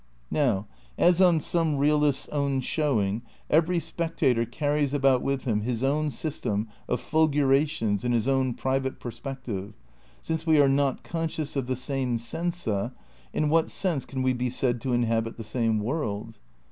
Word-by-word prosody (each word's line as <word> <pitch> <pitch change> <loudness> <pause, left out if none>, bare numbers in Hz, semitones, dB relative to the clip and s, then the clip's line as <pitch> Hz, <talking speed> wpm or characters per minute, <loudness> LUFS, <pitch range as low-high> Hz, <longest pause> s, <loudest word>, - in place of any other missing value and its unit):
Now, 115 -9 +1 0.3
as 175 +1 +4
on 175 -3 +5
some 160 -2 0
realists' 150 0 +2
own 140 -2 0
showing,^ 115 -9 0 0.3
every 165 +3 +3
spec 165 0 -4
tator 115 -3 +2
carries 145 +1 0
about 135 -3 +3
with 135 -1 -1
him 110 -4 0
his 120 +2 -2
own 150 +3 +1
system 115 -6 -2 0.2
of 125 - +1
fulgura 145 -2 +3
tions 110 -9 -1
and 125 - 0
his 120 0 +1
own 130 -2 +1
private 130 0 -1
perspective, 120 -5 -6 0.4
since 160 0 -3
we 155 -2 +5
are 140 - +6
not 135 -1 +1
conscious 160 -3 -3
of 135 -3 -1
the 130 - 0
same 130 -1 -1
sensa, 120 - -2 0.4
in 155 - 0
what 160 +2 +3
sense 170 -9 -1
can 130 -1 -4
we 130 0 +3
be 125 0 -1
said 120 -1 -1
to 130 -2 -1
inhabit 115 -1 0
the 115 - -6
same 115 -1 0
world? 110 -3 -3
135 Hz, 165 wpm, -27 LUFS, 120-150 Hz, 0.4 s, are